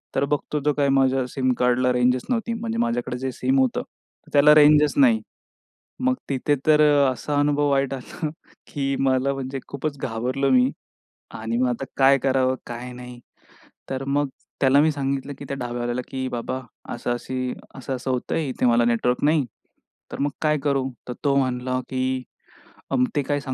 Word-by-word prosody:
तर 135 - +2
बघतो 150 +1 -1
तो 150 - +3
काय 140 -1 +1
माझ्या 135 -1 +3
सिम 130 0 0
कार्डला 125 +1 +3
रेंजच 125 +1 +2
नव्हती. 235 -2 -1
म्हणजे 230 0 -3
माझ्याकडे 235 - -1
जे 130 0 -2
सिम 130 +2 +1
होतं 130 -2 +1 0.5
त्याला 145 +1 +7
रेंजच 150 0 +6
नाही. 240 -5 +5 0.8
मग 260 0 +3
तिथे 140 +2 +1
तर 155 -1 +6 0.3
असा 145 +4 -2
अनुभव 145 0 +2
वाईट 135 -1 +1
आला, 150 +4 -5 0.4
की 140 -2 -2
मला 135 0 +2
म्हणजे 135 0 -4
खूपच 140 +1 -4
घाबरलो 130 +4 -1
मी 130 +1 +4 0.7
आणि 115 +1 -2
मग 125 - +2
आता 125 +2 -3
काय 135 0 +6
करावं? 130 -1 +2
काय 120 +1 -6
नाही. 125 0 -10 0.7
तर 135 0 -2
मग 145 +1 0 0.3
त्याला 140 +1 +5
मी 155 - +3
सांगितलं, 140 -1 -3
की 140 - -7
त्या 140 - -4
ढाब्यावाल्याला, 120 0 -3
की 130 -1 -3
"बाबा 125 +1 -3 0.3
असं 120 0 -3
अशी 130 +1 -3 0.2
असं-असं 130 0 -4
होतंय 140 +4 -1
इथे 125 - -1
मला 120 0 +4
नेटवर्क 120 +2 +1
नाही. 150 -2 +3 0.7
तर - - -6
मग 145 - +1
काय 150 -1 +2
करू?" 135 -2 +1 0.2
तर 125 - -3
तो 140 -1 +3
म्हणला 130 -1 0
की 130 -1 -2 1.1
"ते 145 - +2
काय 145 +1 -1
135 Hz, 165 wpm, -23 LUFS, 125-145 Hz, 1.1 s, त्याला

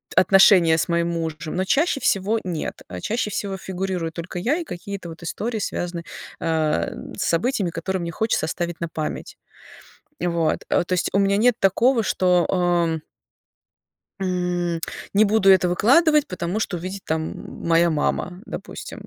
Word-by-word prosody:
отношения 185 -4 +6
с - - 0
моим 170 0 +1
мужем, 160 -2 -4
но 185 - 0
чаще 290 - +2
всего 205 +2 +1
нет. 170 -4 -4
А 90 - -7
чаще 225 -1 -1
всего 195 -2 -3
фигурирую 185 -3 -3
только 175 +2 -6
я 245 +11 +1
и 345 - -3
какие-то 195 - -7
вот 165 +1 -10
истории, 220 +7 -3
связанные, 175 -4 -3 0.3
а, 160 -2 0 0.3
с 195 - -1
событиями, 195 +2 +1
которые 185 +3 -3
мне 170 0 -4
хочется 220 -1 0
оставить 175 +1 -3
на 170 - -2
память, 155 -1 -5 0.8
вот. 170 -3 0
То - - +1
есть 180 - +1
у 195 - +2
меня 200 0 +3
нет 235 +2 +4
такого, 230 +6 +3
что, 180 -3 +2
а 175 -3 +1 1.2
м, 180 -2 -1 0.3
не 210 +2 +6
буду 200 -2 +4
это 185 -1 +5
выкладывать, 295 - +4
потому 180 +2 -3
что 195 - -2
увидит 185 +3 -6
там 160 0 -4
моя 170 +1 +4
мама, 180 +3 -1
допустим. - - -8
180 Hz, 155 wpm, -23 LUFS, 170-200 Hz, 1.2 s, отношения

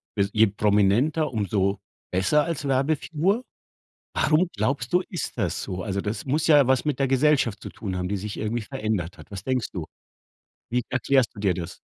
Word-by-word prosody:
bes 100 -2 +1
je 110 +1 +5
prominenter, 105 +10 +2
umso 100 -3 0 0.3
besser 95 +12 +3
als 155 -4 -3
Werbefigur. 155 - +1 0.7
Warum 160 +4 +3
glaubst 120 +4 -1
du, 180 - +5
ist 175 - -4
das 100 -8 -1
so? 90 -2 -4
Also, 100 +1 -2
das 105 +3 -4
muss 145 +3 0
ja 145 -4 +6
was 130 -1 +2
mit 150 -4 0
der 135 -1 +1
Gesellschaft 135 -5 +2
zu - - -6
tun 95 -4 -5
haben, 90 0 -2
die 100 - -1
sich 105 +1 -5
irgendwie 110 +2 -2
verändert 105 -5 -3
hat. - - -14
Was 100 -2 -7
denkst 130 -4 0
du? 90 -4 -4 0.9
Wie 125 +1 +1
erklärst 130 -1 +2
du 100 - -9
dir 100 -3 +2
das? 85 -2 -6
115 Hz, 185 wpm, -25 LUFS, 100-140 Hz, 0.9 s, ja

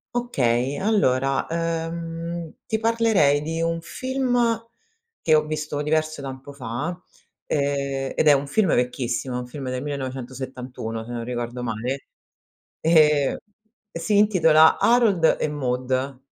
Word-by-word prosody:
Okay, 135 - 0
allora, 135 -11 +1
uhm, 165 0 -3
ti 220 - -1
parlerei 220 -11 +3
di 165 +2 -3
un 165 0 -1
film 245 +1 0 0.6
che 155 - +4
ho 155 0 +3
visto 150 -1 -3
diverso 155 0 0
tempo 135 +1 -8
fa, 130 +7 -4 0.5
ehm, 140 -2 -1
ed 155 - +2
è - - +9
un 140 0 0
film 190 +3 +2
vecchissimo, 125 0 -1
un 125 - -4
film 135 +2 -7
del 125 +1 -3
1971 130 -4 -5
se 120 - -9
non 120 -1 -4
ricordo 120 0 -4
male, 125 +4 -3 0.7
ehm, 150 -4 +4 0.6
si 170 +5 +1
intitola 165 -7 +5
Harold 220 -9 +4
e - - +1
Maude. 130 -1 -2
145 Hz, 125 wpm, -23 LUFS, 130-165 Hz, 0.7 s, è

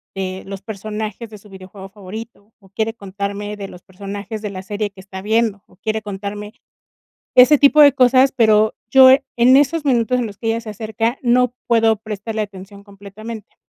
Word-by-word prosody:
de 190 -1 -5
los 195 0 -8
personajes 215 +2 -6
de 215 - -11
su 210 +1 -19
videojuego 190 0 -12
favorito, 210 +2 -11
o 195 - -22
quiere 220 +3 -2
contarme 200 0 -6
de 200 -1 -7
los 180 -2 -14
personajes 200 +3 -8
de 210 - -4
la 190 -1 -8
serie 205 +2 -3
que 195 - -19
está 190 0 -9
viendo, 220 -1 0
o 185 - -23
quiere 220 +2 -3
contarme 205 +1 -7 0.8
ese 265 +4 +7
tipo 285 +2 +5
de 290 -1 +8
cosas, 260 0 +4
pero 220 -3 +3 0.2
yo 260 0 +8 0.3
en 245 +2 +5
esos 290 +3 +2
minutos 250 -2 +1
en 245 - -1
los 205 -2 -10
que 225 - -4
ella 225 +1 0
se 225 -2 -8
acerca, 225 +3 -3
no 250 0 +2
puedo 225 -2 +3
prestarle 215 +1 -5
atención 200 0 -10
completamente. 205 +2 -11
215 Hz, 185 wpm, -19 LUFS, 200-230 Hz, 0.8 s, de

